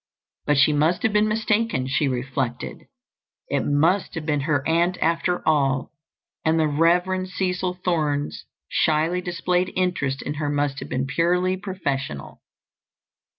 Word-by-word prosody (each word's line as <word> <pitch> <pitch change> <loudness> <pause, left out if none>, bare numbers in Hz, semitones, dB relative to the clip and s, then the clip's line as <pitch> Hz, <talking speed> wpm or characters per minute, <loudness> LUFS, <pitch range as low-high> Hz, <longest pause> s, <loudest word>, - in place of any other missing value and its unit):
But 150 - +3
she 145 +2 +5
must 155 +7 +1
have 225 -3 +2
been 210 0 +3
mistaken, 215 - 0
she 135 +2 +1
reflected; 130 -1 -3 0.6
it - - +1
must 165 +7 +1
have 160 -2 -4
been 150 -2 +1
her 145 -2 +1
aunt 170 +3 +2
after 165 +2 0
all, 135 -4 +2 0.5
and 160 +1 +2
the 160 - +3
Rev. 180 +5 +2
Cecil 185 -1 -2
Thorne's 145 - -1 0.2
shyly 160 +3 +1
displayed 180 +1 -1
interest 175 -8 -1
in 145 - -3
her 145 - 0
must 145 -1 -1
have - - -8
been 130 +1 -1
purely 180 +6 +1
professional. 140 - -4
160 Hz, 140 wpm, -23 LUFS, 145-180 Hz, 0.6 s, she